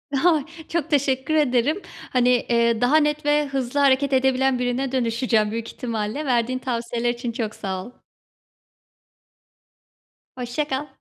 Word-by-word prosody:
Ha! 310 0 +3 0.2
Çok 335 -4 -2
teşekkür 275 0 +1
ederim. 290 +5 +2 0.3
Hani, 250 -1 +2
eee, 235 -1 +2
daha 270 +6 +4
net 295 -1 +1
ve 295 0 +3
hızlı 270 0 -2
hareket 275 0 +3
edebilen 265 0 +2
birine 250 +1 -1
dönüşeceğim 230 -3 +1
büyük 230 0 -4
ihtimalle. 230 +4 -3
Verdiğin 255 0 +1
tavsiyeler 235 -1 -2
için 240 0 -3
çok 225 -1 -4
sağ 190 -1 -4
ol. - - -11 2.4
Hoşça 250 +4 -3
kal. 280 +1 -3
255 Hz, 130 wpm, -23 LUFS, 235-280 Hz, 2.4 s, daha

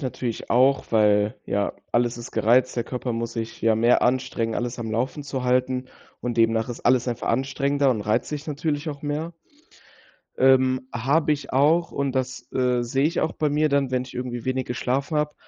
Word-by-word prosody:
natürlich 125 -4 -4
auch, 130 +3 +3
weil, 105 -1 +3
ja, 100 0 -1 0.2
alles 120 0 +1
ist 120 -1 -8
gereizt, 125 +3 +3
der 120 -1 -1
Körper 125 -1 -4
muss 115 0 -3
sich 115 -1 -5
ja 115 -1 +3
mehr 115 +2 +4
anstrengen, 125 -3 0
alles 120 0 -3
am 115 -2 -4
Laufen 125 +6 -2
zu 135 -2 -4
halten 125 0 +1 0.4
und 120 -1 -3
demnach 115 0 +2
ist 120 - -7
alles 125 0 +3
einfach 120 -2 -3
anstrengender 140 +2 +1
und 115 -4 0
reizt 105 +1 0
dich 150 0 -5
natürlich 150 +1 -2
auch 145 -2 -6
mehr. 155 +3 -3 1.0
Ähm, 130 0 +3
habe 145 +7 +2
ich 145 -2 -5
auch 155 +6 +3
und 140 -1 -1
das, 130 -1 -3
äh, 125 -1 +1
sehe 135 +3 0
ich 165 +4 +1
auch 160 - 0
bei 150 - 0
mir 150 +1 +2
dann, 140 -2 +1
wenn 130 -1 0
ich 130 - -13
irgendwie 125 -1 -4
wenig 130 0 -1
geschlafen 135 +5 -1
habe, 150 0 0
130 Hz, 195 wpm, -24 LUFS, 120-140 Hz, 1.0 s, mehr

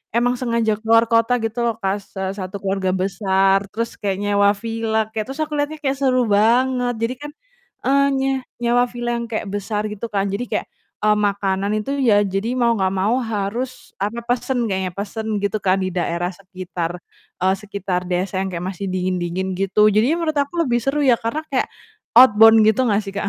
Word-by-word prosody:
emang 245 +1 +3
sengaja 235 -3 0
keluar 230 +1 +5
kota 230 +1 +3
gitu 225 +1 -4
loh, 230 -2 0
Kak, 195 -1 0
se 195 - -11 0.2
1 190 0 -5
keluarga 195 -1 -1
besar 195 +1 +2
terus 230 +1 -3
kayak 195 -2 -2
nyewa 200 0 +3
villa, 225 0 -2 0.2
kayak, 215 -1 -1
terus 275 - -8
aku 305 0 -6
lihatnya 290 +2 -1
kayak 270 -1 +1
seru 255 -2 +3
banget. 245 +4 +2
Jadi 230 +2 -1
kan, 295 - -7 0.5
eee, 280 +1 +4
nye 270 0 +1 0.3
nyewa 240 +1 +3
villa 240 0 -4
yang 235 0 -3
kayak 220 - -2
besar 205 +1 -2
gitu 210 +2 -6
kan 200 -1 0
jadi 240 +5 -2
kayak, - - -1 0.4
eee, 210 - +5
makanan 200 0 -1
itu 215 +6 -3
ya 205 -5 +4
jadi 195 +4 -2
mau 235 -1 +3
nggak 190 -1 +1
mau 225 +7 +1
harus, 225 +3 -4
apa, 210 +4 -1
pesen 245 0 0
kayaknya, 190 -1 -1
pesen 215 +2 -4 0.2
gitu 205 +2 0
kan 190 0 +2
di 185 - -1
daerah 175 0 -1
sekitar, 180 -2 -6 0.4
eee, 190 +1 +3
sekitar 200 -3 -3
desa 185 +1 -1
yang 190 - -2
kayak 175 -1 -5
masih 195 +2 -6
dingin-dingin 185 0 -2
gitu 195 +2 +3
jadi 240 +10 +3
menurut 330 -2 -1
aku 285 +2 0
lebih 240 -2 +1
seru 275 +4 -1
ya 255 - +6
karena 230 +7 -2
kayak 255 - +1 0.5
outbound 225 -2 +8
gitu 220 +4 +3
gak 205 0 +2
sih, 195 - -7
Kak? 205 0 -2
215 Hz, 190 wpm, -20 LUFS, 195-240 Hz, 0.5 s, outbound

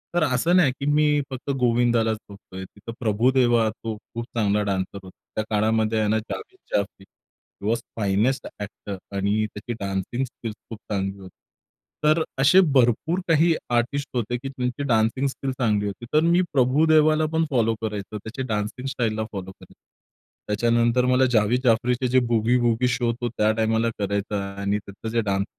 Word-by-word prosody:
तर 175 - +3
असं 150 +5 +2
नाही, 175 -7 +5
की 140 - -3
मी 150 0 +3
फक्त 130 +2 -6
गोविंदालाच 120 -2 +2
बघतोय. 95 -1 -10
तिथं 105 +4 -10
प्रभुदेवा, 120 0 +3
तो 110 0 -6
खूप 115 +2 -8
चांगला 105 -1 +2
डान्सर 100 0 -2
होता. 95 - -14 0.2
त्या 110 - 0
काळामध्ये 110 +1 +1
ह्यांना 110 +1 +2
जावेद 375 - -8 0.2
जाफरी, 100 -1 -2
हि 100 +1 -14
वॉज 115 +2 +1 0.2
फाईनेस्ट 105 +6 +1
एक्टर 100 -1 -6 0.2
आणि 100 +2 +1
त्याची 115 +3 -5
डान्सिंग 100 +6 -2
स्किल्स 115 -3 -8
खूप 115 - -7
चांगली 95 -1 -2
होती. 95 -2 -13 0.7
तर 155 +2 +4 0.2
असे 135 +8 +6 0.2
भरपूर 130 +8 +3
काही 165 0 +4 0.2
आर्टिस्ट 135 +4 0
होते, 120 0 -1
की 135 - -7
त्यांची 125 +1 -3
डान्सिंग 115 +4 +2
स्किल 135 0 -3
चांगली 105 -4 +1
होती. 100 +4 -6
तर 155 - +6
मी 170 +2 +4
प्रभुदेवालापण 155 +4 +3
फॉलो 115 -4 +2
करायचो, 105 -1 -4
त्याच्या 110 +5 -6
डान्सिंग 105 +4 -3
स्टाईलला 115 -5 -1
फॉलो 95 -2 -6
करायचो. - - -17 0.7
त्याच्यानंतर 115 +3 +2
मला 130 +1 +4
जावेद 115 +1 +3
जाफरीचे 125 +1 +2
जे 130 +1 +4
बूगी 115 +1 +2
वूगी 120 +1 +2
शो 120 -1 +1
तो 120 - 0
त्या 105 0 +3
टाईमाला 110 +1 +1
करायचा. 100 0 -1 0.2
आणि 100 +1 0
त्याचं 100 +2 -8
जे 115 - +2
डान्स 100 -2 0
115 Hz, 160 wpm, -24 LUFS, 105-130 Hz, 0.7 s, असे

